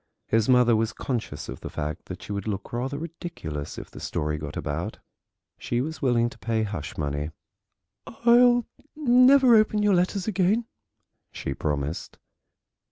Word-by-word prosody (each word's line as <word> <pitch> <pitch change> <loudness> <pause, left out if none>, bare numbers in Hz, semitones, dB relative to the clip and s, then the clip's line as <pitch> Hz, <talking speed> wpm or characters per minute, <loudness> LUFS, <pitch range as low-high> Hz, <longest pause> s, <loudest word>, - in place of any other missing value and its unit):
His 110 +1 +1
mother 125 -2 +5
was 110 0 0
conscious 125 -4 -4
of - - -7
the - - -7
fact 75 +2 -4
that 90 0 -8
she - - -8
would 100 0 -3
look 100 0 -4
rather 130 +4 -2
ridiculous 155 - -6
if - - -8
the - - -10
story 75 0 -2
got 75 -1 -6
about. 75 +4 -3 0.6
She 120 - -1
was 155 +5 -4
willing 120 -4 +3
to - - -15
pay 110 -1 0
hush 85 -8 -5
money. 75 0 -2 0.8
"I'll 240 +1 +4 0.3
never 255 -2 +6
open 215 -1 +3
your 205 -1 +4
letters 185 +2 +1
again," 205 +3 +2 0.7
she 70 - -4
promised. 75 +2 -3
120 Hz, 155 wpm, -26 LUFS, -, 0.8 s, never